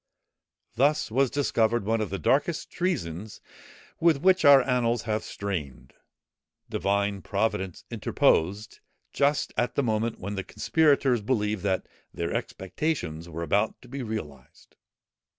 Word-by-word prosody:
Thus 140 0 +2
was 135 +2 +2
discovered, 120 -6 +1
one 110 +1 +1
of 105 - -2
the 100 - -3
darkest 150 - 0
treasons 110 - -3 0.6
with 165 -3 +4
which 185 +4 +4
our 140 -2 +8
annals 120 -3 0
are 110 0 +1
stained. 75 - -6 0.8
Divine 100 0 0
Providence 100 -3 -2
interposed, 100 +7 +1 0.3
just 140 +1 +1
at 120 - 0
the 140 - +1
moment 110 -1 -1
when 100 +3 -5
the 95 -1 -3
conspirators 140 - +2
believed 105 -3 -1
that 95 -2 0 0.3
their 85 0 -3
expectations 90 - -3
were 85 +1 -5
about 100 +7 0
to - - -14
be 135 +2 -6
realized. 80 - -8
110 Hz, 130 wpm, -27 LUFS, 95-135 Hz, 0.8 s, our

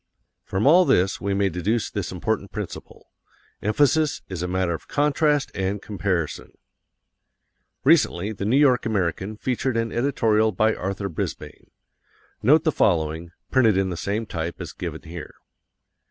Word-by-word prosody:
From 95 +5 -2
all 170 +6 +7
this 95 - +2
we 100 0 -1
may 100 0 +2
deduce 100 +6 -1
this 100 -3 -3
important 100 +2 -2
principle: 105 -4 -8 0.5
EMPHASIS 145 +7 +2
is 90 -3 -5
a 90 - -2
matter 90 -1 0
of 80 - -7
CONTRAST 150 0 +1
and 95 +1 -2
COMPARISON. 95 -6 -3 1.3
Recently 110 - +3
the 100 -2 -5
New 120 +6 +3
York 130 -5 +4
American 100 0 -2
featured 130 +1 -1
an 115 -1 -1
editorial 110 -4 +2
by 110 +4 +2
Arthur 100 +2 -3
Brisbane. 85 - -6 0.7
Note 150 +7 +5
the 155 - +2
following, 80 - +1 0.2
printed 115 -7 +4
in 95 -1 +1
the - - -3
same 105 +6 -2
type 85 -4 -5
as - - -7
given - - -6
here. 80 -1 -9
105 Hz, 145 wpm, -24 LUFS, 95-125 Hz, 1.3 s, all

